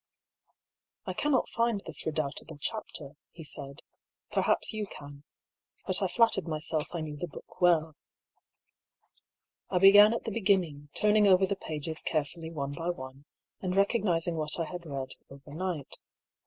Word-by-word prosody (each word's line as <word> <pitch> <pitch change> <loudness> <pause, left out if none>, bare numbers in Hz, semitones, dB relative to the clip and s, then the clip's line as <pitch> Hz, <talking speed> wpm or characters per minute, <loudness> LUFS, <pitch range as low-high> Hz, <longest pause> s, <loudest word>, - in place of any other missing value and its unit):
" - - -63
I - - -3
cannot 290 -3 +1
find 230 -3 0
this 160 -1 -1
redoubtable 155 0 -3
chapter," 150 -4 -4 0.2
he 165 - -10
said; 140 -1 -2 0.2
" - - -49
perhaps - - +2
you 215 -1 -3
can. 145 -3 -11 0.6
But - - +3
I - - +2
flattered 225 -6 +2
myself 155 +1 -2
I 170 - -2
knew 155 -1 -5
the 175 - -4
book - - -13
well." 160 -3 +3 1.7
I - - +1
began 205 +3 +8
at - - -4
the 225 - -4
beginning, 185 -9 +1
turning 210 0 +4
over 190 0 +6
the 200 - -1
pages 155 -2 -5
carefully 160 +1 -2
one 140 -3 -4
by 165 +4 -3
one, 135 -4 -6 0.4
and 185 -1 -2
recognising 185 -5 +2
what 155 +1 0
I 165 - 0
had 175 +1 -7
read 135 -2 -4 0.2
overnight. 150 +3 -5
165 Hz, 155 wpm, -30 LUFS, 150-195 Hz, 1.7 s, began